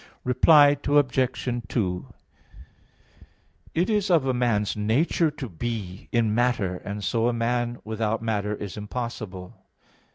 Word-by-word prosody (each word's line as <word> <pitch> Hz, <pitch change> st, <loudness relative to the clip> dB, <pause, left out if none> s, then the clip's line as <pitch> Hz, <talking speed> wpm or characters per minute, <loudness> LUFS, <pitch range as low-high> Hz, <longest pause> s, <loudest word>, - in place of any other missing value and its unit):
Reply 145 Hz, +3 st, +6 dB
Obj. 135 Hz, -3 st, +1 dB, 0.2 s
2: 90 Hz, -6 st, -2 dB, 1.7 s
It 175 Hz, +3 st, +2 dB
is 210 Hz, -2 st, +1 dB
of 165 Hz, -6 st, +4 dB
a 130 Hz, -, +1 dB
man's 115 Hz, -4 st, 0 dB
nature 125 Hz, +10 st, +1 dB
to 145 Hz, -3 st, -7 dB
be 100 Hz, -1 st, -5 dB
in 115 Hz, -3 st, +2 dB
matter, 110 Hz, -6 st, +1 dB
and 100 Hz, +2 st, -6 dB
so 115 Hz, +4 st, +1 dB
a 120 Hz, -, +1 dB
man 120 Hz, +1 st, -1 dB
without 110 Hz, 0 st, -2 dB
matter 105 Hz, -2 st, -1 dB
is 100 Hz, -1 st, -7 dB
impossible. 105 Hz, -4 st, -6 dB
115 Hz, 125 wpm, -25 LUFS, 105-130 Hz, 1.7 s, Reply